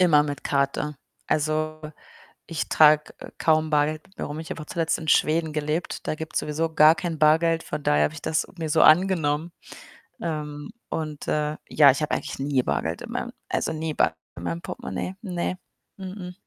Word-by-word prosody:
Immer 160 -5 +6
mit 145 -2 -5
Karte. 140 +1 0 0.3
Also, 155 +1 0 0.7
ich 165 -1 -3
trage, 150 -1 +5
äh, - - -9
kaum 155 -1 +2
Bargeld 150 +1 +1
mit 190 - -28
mir - - -2
rum. 150 +2 -5
Ich 160 - -9
habe 160 - -5
auch - - -10
zuletzt 165 0 -1
in 160 - -8
Schweden 160 +1 +3
gelebt, 150 +3 -3
da - - +1
gibt's 160 0 -4
sowieso 160 +2 -2
gar 155 +1 +7
kein 170 -4 -4
Bargeld, 160 +2 +4
von 150 0 -5
daher 75 - +3
habe 75 +1 -1
ich - - -9
das 160 - 0
mir 160 -1 -3
so 160 - +4
angenommen. 165 -2 +4 0.7
Ähm, 150 -3 -4 0.2
und, 155 -2 -4
äh, 150 0 0
ja, 145 -2 +7
ich 140 - -3
habe 150 - -1
eigentlich - - -3
nie 135 -2 +1
Bargeld 80 -6 -2
in - - -8
meinem - - -3 0.2
also, - - -1
nie 160 0 -3
Bargeld 80 - +1 0.2
in 85 - -8
meinem 85 -1 -3
Portemonnaie. 180 - -5
Ne, 180 -2 -3 0.4
mh 190 - -8
mh. 180 -3 -7
155 Hz, 195 wpm, -25 LUFS, 145-160 Hz, 0.7 s, gar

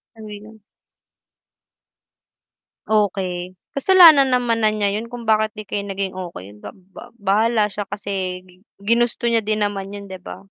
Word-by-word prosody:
Ano 220 -1 -11
'yon? 215 +1 -12 2.3
Okey, 185 -4 -1 0.2
kasalanan 315 -3 +7
naman 240 -2 +1
na 215 - +4
niya 205 -2 -1
yun 225 +3 -4
kung 245 -1 -8
bakit 215 0 +2
di 215 - -7
kayo 200 0 -3
naging 195 -1 -3
okey. 170 - -8
Ba - - -8 0.2
ba - - -11
bahala 215 +2 +2
siya 205 0 -5
kasi 190 -2 -4
gi 180 0 -22 0.2
ginusto 235 +4 0
niya 230 -1 +2
din 215 0 0
naman 195 -1 -4
yun 200 0 -8
'di 190 -2 -10
ba? - - -9
210 Hz, 155 wpm, -20 LUFS, 195-225 Hz, 2.3 s, kasalanan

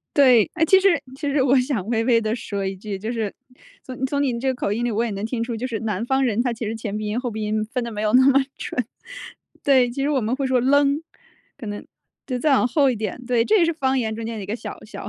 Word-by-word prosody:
对。 255 -7 +5
诶， 325 -1 +2
其 380 +4 +5
实 390 - +5 0.3
其 285 0 -2
实 275 -1 +2
我 265 0 +4
想 250 -7 -2
微 230 -1 +1
微 235 -2 +4
地 220 0 -1
说 200 -4 -4
一 190 0 -2
句， 200 0 -6
就 220 +4 -4
是， 220 -4 -2 0.5
从 255 0 -6
从 285 +1 -1
您 250 -4 0
这 265 0 +1
口 225 -5 -2
音 235 +3 -1
里 240 - 0
我 225 +2 0
也 235 - -2
能 200 +1 -4
听 230 0 -2
出， 235 -1 -3
就 245 - -3
是， 225 -5 -4
南 215 -1 -2
方 265 +2 +1
人， 235 -1 +1
他 245 -2 0
其 225 0 -5
实 220 - -3
前 210 -2 -4
鼻 215 0 -3
音、 215 +3 -1
后 245 -2 -3
鼻 215 0 -5
音 215 0 -1
分 250 +3 -3
得 235 - -5
没 210 0 -4
有 215 0 +1
那 260 +1 +6
么 275 0 +5
准。 250 - -3 0.8
对， 260 -3 +4
其 275 +3 -3
实 285 - +1
我 275 -3 +1
们 225 +3 -1
会 275 -1 -1
说 255 -1 +2
leng， 285 +3 +3 0.5
可 255 - -9
能， 205 0 -6 0.4
就 255 -2 -2
再 295 +3 +2
往 255 - +3
后 275 0 +3
一 240 - -2
点， 215 +3 -4
对。 240 -2 +2
这 430 - +3
也 340 - +4
是 335 - +1
方 265 -4 0
言 220 -2 -1
中 230 - -5
间 230 0 -4
的 205 - -5
一 - - -7
个 215 +3 -3
小 - - -8
小 - - -8
240 Hz, 320 characters per minute, -22 LUFS, 220-265 Hz, 0.8 s, 那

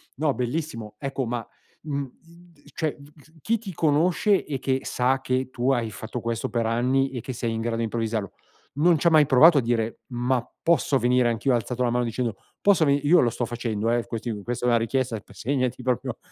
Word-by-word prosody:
No, 150 +1 +1
bellissimo. 120 -4 -4
Ecco, 135 -1 -3
ma, 120 0 -4 0.4
mhmm, 140 -2 -2 0.5
i 145 - -25
d - - -18
cioè, 155 -3 -1 0.5
chi 230 +7 +1
ti 200 -4 -8
conosce 165 +6 +2
e 135 -3 -4
che 130 0 0
sa 130 +2 +1
che 130 0 -1
tu 130 +1 0
hai 120 -3 0
fatto 110 +4 -6
questo 115 -1 -2
per 115 0 -1
anni 130 +4 +1
e 125 -3 -5
che 130 - -6
sei 115 -1 -2
in 115 - -3
grado 115 0 -2
di 115 - -1
improvvisarlo, 110 -2 -2 0.4
non 165 +4 +4
c'ha 170 +3 +3
mai 155 -2 +6
provato 150 +5 +7
a - - +1
dire: 115 -1 -1
"Ma 125 +1 0 0.2
posso 160 -5 +2
venire 125 0 +3
anch'io?" 120 +3 +1
Ha - - +4
alzato 125 +2 -2
la 120 - +2
mano 120 +1 +1
dicendo: 115 -1 -2 0.3
"Posso 195 -6 +4
veni" 140 0 +2
Io 175 +3 +6
lo 120 - +3
sto 120 - -2
facendo, 115 -2 -2
eh, 120 0 +1
quest 115 +1 -5
questa 120 0 -3
è - - +3
una 120 - +4
richiesta, 115 0 -1
segnati 130 -1 -2
proprio 125 -2 -2
125 Hz, 210 wpm, -25 LUFS, 115-140 Hz, 0.5 s, provato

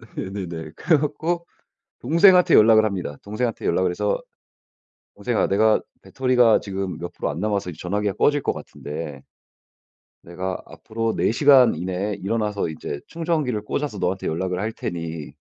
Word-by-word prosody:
네. 95 - -4 0.2
네네. 80 -2 -7
그래 165 -3 +3
갖고 160 +4 -2 0.6
동생한테 180 +6 +5
연락을 110 0 +7
합니다. 95 -8 -3
동생한테 110 +3 -3
연락을 90 -1 +2
해서 - - -1 0.9
"동생아. 120 -2 0
내가 110 +2 +3 0.2
배터리가 125 -3 +3
지금 95 -2 -4
몇 85 +1 -6
프로 - - -3
안 75 - -5
남아서 100 -2 -1
이제 80 - -12
전화기가 100 +2 -1
꺼질 145 +6 +2
것 - - 0
같은데 75 -2 -7 1.0
내가 90 +2 -5
앞으로 115 0 -4
4 - - +2
시간 135 -2 +6
이내에 95 +5 -3
일어나서 105 -1 -2
이제 75 -2 -6
충전기를 160 -9 -1
꽂아서 115 0 -3
너한테 95 +1 -1
연락을 90 +3 -2
할 110 +3 -2
테니 80 -6 -5
105 Hz, 340 characters per minute, -23 LUFS, 90-125 Hz, 1.0 s, 연락을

